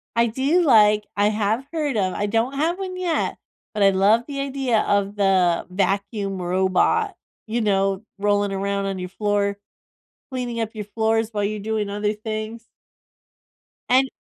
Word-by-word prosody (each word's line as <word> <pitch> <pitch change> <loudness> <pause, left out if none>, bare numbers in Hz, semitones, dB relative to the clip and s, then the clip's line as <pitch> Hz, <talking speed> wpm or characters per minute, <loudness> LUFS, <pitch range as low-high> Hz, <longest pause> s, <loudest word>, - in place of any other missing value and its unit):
I 235 0 +4
do 270 +10 +1
like 210 -6 +5
I 205 +1 +3
have 215 +4 0
heard 300 -6 -1
of 185 -2 0
I 205 - -1
don't 225 +5 0
have 320 +5 0
one 370 -1 -5
yet, 350 -3 -1 0.4
but 210 - +1
I 195 - +6
love 200 +5 +3
the 280 -1 -5
idea 270 -5 0
of 200 0 0
the 190 -4 +2
vacuum 195 +1 -1
robot, 185 +1 +1 0.3
you 235 +2 -1
know, 195 -1 +1
rolling 205 0 +1
around 200 0 -1
on 195 -1 -3
your 180 - -5
floor, 200 0 0 0.7
cleaning 245 -3 -3
up 220 - -2
your 210 - -5
floors 220 +1 0
while 205 -1 -1
you're 210 0 -2
doing 215 -1 -2
other 210 +1 -1
things. 215 +1 -6 1.2
And 260 +2 +4
210 Hz, 160 wpm, -22 LUFS, 200-235 Hz, 1.2 s, I